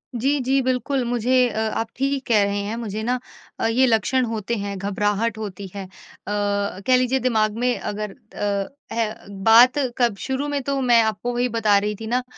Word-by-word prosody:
जी, 275 +5 +1
जी। 265 +1 +1
बिल्कुल, 255 +1 0
मुझे 245 +1 0
अ, 220 - -4
आप 220 +1 -1
ठीक 275 0 -1
कह 215 -4 +4
रहे 200 0 -1
हैं 210 +3 -3
मुझे 220 -2 -4
ना 250 +2 0 0.4
अ, - - 0
ये 245 +4 +3
लक्षण 250 +3 +2
होते 225 0 -3
हैं 200 -1 -4
घबराहट 205 +3 -1
होती 200 -2 -6
है। 200 - -4
अ, - - -16 0.4
कह 205 +2 0
लीजिए 255 +1 +1
दिमाग 220 -4 +1
में 245 +1 +1
अगर 210 0 -4 0.2
अ, 200 -1 -1 0.3
ए 225 -2 0 0.3
बात 240 +5 +7 0.2
कब 240 -4 +2
शुरू 265 +2 -2
में 290 -1 -1
तो 275 +1 -1
मैं 240 -2 +5
आपको 220 +3 -2
वही 245 +1 0
बता 215 -3 +3
रही 210 +1 -2
थी 220 +2 -8
ना 250 +2 0
230 Hz, 195 wpm, -22 LUFS, 205-250 Hz, 0.4 s, बात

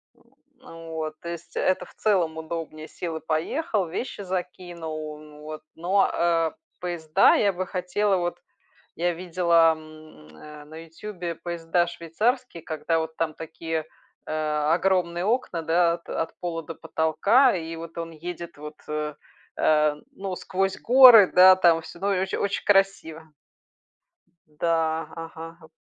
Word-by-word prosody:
М, - - -27 0.4
вот. 160 -6 -7
То 170 - -6
есть 170 0 -8
это 185 - +1
в - - -18
целом 175 -7 +1
удобнее: 160 -1 -6
сел 165 -1 -5
и - - -9
поехал, 185 - -1
вещи 205 +5 -5
закинул, 175 -4 -5
ну 150 -1 -14
вот. 155 0 -8
Но, 185 +4 +2
а, 165 -1 +1 0.2
поезда 175 0 +3
я 200 -2 +2
бы 185 +1 -3
хотела 190 +2 0
вот 175 0 -3 0.6
я 175 +1 +1
видела, 170 -2 +3
м, 155 - -15
э, 150 - -12
на 155 +1 -13
"Ютубе" 175 0 -6
поезда 170 0 -1
швейцарские, 175 - -2
когда 160 +1 -1
вот 160 0 -5
там 160 -2 -1
такие, 160 0 -5 0.4
э, - - -5 0.4
огромные 180 -1 +1
окна, 215 -8 -1
да, 170 +1 +3
от 170 - -8
от 160 - -4
пола 165 -2 -4
до 165 - -8
потолка, 180 - +3
и 165 0 -6
вот 165 0 -9
он 165 0 -5
едет, 170 0 -8
вот, 150 +1 -9
э, 150 -1 -3 0.4
э, 150 -1 +3 0.2
ну, 190 -1 -5
сквозь 190 +1 -2
горы, 245 -5 +8
да, 185 +1 +9
там 170 -3 +4
всё, 170 - -12
ну, 200 +1 0
и - - 0
оч 190 0 -3
очень 200 0 -2
красиво. 195 -5 +2 1.2
Да. 160 +1 -1
Ага, 165 0 -8
г 160 - -15
170 Hz, 150 wpm, -25 LUFS, 160-185 Hz, 1.2 s, да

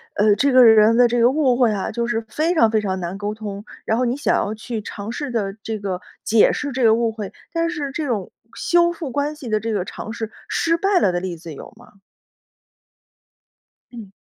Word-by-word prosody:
呃， 205 0 +4
这 280 +4 +2
个 255 -1 +7
人 220 0 +6
的 245 - +6
这 240 +1 0
个 235 +1 +5
误 270 -4 +2
会 245 -3 +3
啊， 200 -2 -2
就 235 0 -2
是 235 -2 -1
非 325 +3 0
常 230 -9 +4
非 220 -1 +2
常 190 -2 -2
难 175 +2 -5
沟 205 +1 -3
通， 205 -2 -7 0.2
然 220 - +1
后 250 - +1
你 245 - 0
想 - - +1
要 210 - -1
去 220 0 -5
尝 205 +2 -7
试 280 +1 -5
着 200 -4 -2
这 220 -2 -4
个 190 -2 -4 0.2
解 220 -1 +4
释 290 -1 -3
这 255 -1 -2
个 220 -1 +6
误 230 0 +1
会， 210 -3 -7 0.2
但 335 0 0
是 295 -5 -4
这 310 +1 -3
种 215 -7 -3 0.2
修 345 0 +2
复 315 -6 -6
关 290 +3 -1
系 275 -5 -10
的 215 - +1
这 225 +2 -3
个 195 -4 -1
尝 220 - -7
试， 225 -1 -5 0.2
失 335 0 +1
败 390 +1 +2
了 185 - +2
的 175 - -1
例 180 -2 -5
子 160 -1 -9
有 - - -11
吗？ 230 -3 -19 1.9
嗯。 220 -5 -10
230 Hz, 245 characters per minute, -21 LUFS, 210-270 Hz, 1.9 s, 个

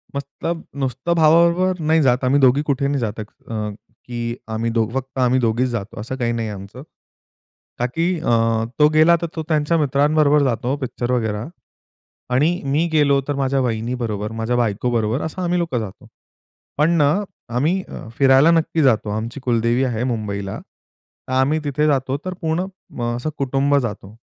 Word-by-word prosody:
मस्त 140 0 -4 0.5
नुसतं 130 +6 -1
भावाबरोबर 170 +3 +4
नाही 160 +1 +2
जात 130 -2 +2
आम्ही 135 +3 +3
2घी 135 +1 +4
कुठे 140 0 +1
नाही 140 -1 0
जात 110 -2 -3
अ, 110 - -3 0.8
की 120 -1 -4 0.2
आम्ही 115 +1 -1 0.2
फक्त 135 0 -5
आम्ही 130 0 +3
2घीच 120 +1 +1
जातो 110 -3 -5
असं 120 +4 -5
काही 120 -3 -1
नाहीये 115 -2 -2
आमचं. 100 +6 -10 1.0
का, 125 - +1
की 165 +8 0
अ, 155 - -2 0.5
तो 150 - +7
गेला 160 +2 +6
तर 170 - -1
तो 160 - -3
त्यांच्या 155 +2 +2
मित्रांबरोबर 145 0 +3
जातो 125 +1 0
पिक्चर 125 -1 -3
बघायला 110 -3 -1 0.9
आणि 145 +6 +3
मी 145 +5 +1
गेलोतर 140 -2 +2
माझ्या 135 0 0
वहिनीबरोबर, 115 -2 -2
माझ्या 115 +2 -2
बायकोबरोबर 115 +2 0
असं 160 +4 -4
आम्ही 180 0 0
लोकं 165 -8 -1
जातो. 100 -4 -8 0.7
पण 150 +4 +3
ना, 145 -2 +4 0.5
आम्ही 170 +9 +1 0.3
फिरायला 135 +3 +6
नक्की 165 -1 +1
जातो 115 -5 +2
आमची 115 +5 -4
कुलदेवी 120 +1 +1
आहे 120 -2 -2
मुंबईला. 100 -5 -3 0.7
तर 130 - -4
आम्ही 135 +4 +2
तिथे 145 +1 0
जातो 135 -1 +1
तर 185 - -3
पूर्ण 165 +3 0 0.5
असं 125 +6 -3
कुटुंब 140 +1 +1
जातो. 105 -4 -4
130 Hz, 155 wpm, -20 LUFS, 115-150 Hz, 1.0 s, तो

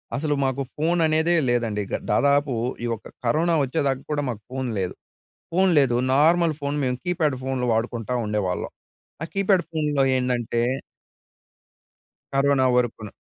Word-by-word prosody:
అసలు 145 0 0
మాకు 130 +1 0
ఫోననేదే 160 +1 +2 0.2
లేదండి, 115 -4 0
ఇగ. - - -2 0.2
దాదాపు 140 +4 +3 0.3
ఈ - - -1
యొక్క 110 - -5 0.2
కరోనా 165 +7 +2
వచ్చేదాకా 135 -1 -1
కూడా 145 -1 0
మాకు 110 -3 -5
ఫోన్ 130 -1 -3
లేదు. 90 -2 -2 0.6
ఫోన్ 190 +1 +3
లేదు, 125 -4 +3 0.2
నార్మల్ 165 +2 +4
ఫోన్ 140 +1 -2
మేము 125 0 0
కీప్యాడ్ 160 -6 0
ఫోన్‌లు 130 -2 -1
వాడుకుంటా 115 +1 -2
ఉండేవాళ్ళం. 105 -4 -2 0.5
ఆ - - -1
కీప్యాడ్ 195 -3 +3
ఫోన్‌లో 150 -3 +1
ఏందంటే 120 -2 0 1.7
కరోనా 135 -1 +3
వరకున. 115 -4 -1
135 Hz, 130 wpm, -24 LUFS, 120-155 Hz, 1.7 s, నార్మల్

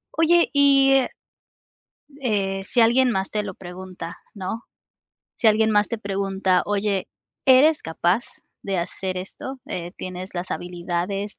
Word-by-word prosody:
Oye, 340 +1 +4
y, 275 -1 +5
eh 265 -2 +3 1.1
eh, 195 -4 0
si 240 +4 +1
alguien 245 +2 +5
más 190 -1 -1
te 210 -1 -1
lo 195 -3 -6
pregunta, 180 -1 -8 0.2
¿no? 200 +4 -5 0.7
Si 230 - +1
alguien 220 +1 +3
más 205 -1 +3
te 230 - -2
pregunta: 195 -2 0
"Oye, 200 -2 0 0.4
¿eres 285 +4 +6
capaz 175 +7 0 0.4
de 195 -1 -2
hacer 185 +2 -3
esto? 260 +8 -6
Eh, 175 0 -5
¿tienes 185 +1 -7
las 175 +1 -4
habilidades, 180 +3 -3
195 Hz, 135 wpm, -23 LUFS, 185-235 Hz, 1.1 s, eres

